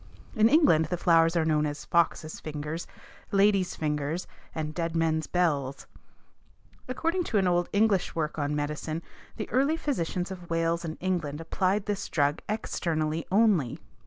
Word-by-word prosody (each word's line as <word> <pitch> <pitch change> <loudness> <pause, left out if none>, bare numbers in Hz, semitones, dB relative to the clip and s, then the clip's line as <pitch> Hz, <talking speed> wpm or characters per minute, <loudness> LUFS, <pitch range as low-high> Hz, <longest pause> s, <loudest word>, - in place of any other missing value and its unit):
In 220 +1 +5
England 255 - +5
the 175 +3 -2
flowers 165 -1 +4
are 160 - +2
known 155 -1 +2
as 145 0 -6
foxes' 165 -2 +1
fingers, 150 +2 -5 0.4
ladies' 195 -2 +3
fingers 150 +2 -2 0.3
and 155 -1 -3
dead 165 0 -2
men's 160 -1 +1
bells. 145 -7 0 1.0
According 330 +8 0
to 220 - 0
an 190 -2 +3
old 175 0 +1
English 200 -2 +2
work 155 -1 -2
on 145 0 -1
medicine 150 +2 -3 0.3
the 215 - -4
early 280 +5 +2
physicians 185 - -2
of 180 -2 -8
Wales 165 0 0
and 160 -1 -5
England 170 -6 -1
applied 190 +4 0
this 205 -1 -3
drug 145 -1 +1
externally 165 -7 -1
only. 195 - +3
165 Hz, 150 wpm, -28 LUFS, 155-195 Hz, 1.0 s, In